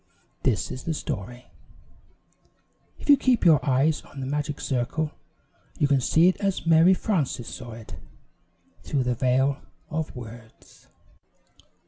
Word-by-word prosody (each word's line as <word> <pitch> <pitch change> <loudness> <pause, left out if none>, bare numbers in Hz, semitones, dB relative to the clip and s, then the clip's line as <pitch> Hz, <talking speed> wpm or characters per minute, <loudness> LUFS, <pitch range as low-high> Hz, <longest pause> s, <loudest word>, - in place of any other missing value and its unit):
This - - 0
is 130 - -7
the 165 - -1
story. 125 - -5 1.5
If - - -12
you 290 - +9
keep 255 -6 +1
your 155 -5 +6
eyes 140 +3 +2
on 140 - -12
the 130 - -4
magic 145 +1 -3
circle 135 +4 -1 0.7
you 145 - +2
can 140 -2 +2
see 160 +7 +4
it 185 - +2
as 195 -3 -1
Mary 165 +3 +6
Frances 145 - -1
saw 120 -3 -8
it 110 -1 -11 0.9
through 140 -3 -1
the 125 0 0
veil 130 +3 +1 0.3
of 155 -1 -3
words. 115 -2 -12
140 Hz, 135 wpm, -25 LUFS, 125-160 Hz, 1.5 s, you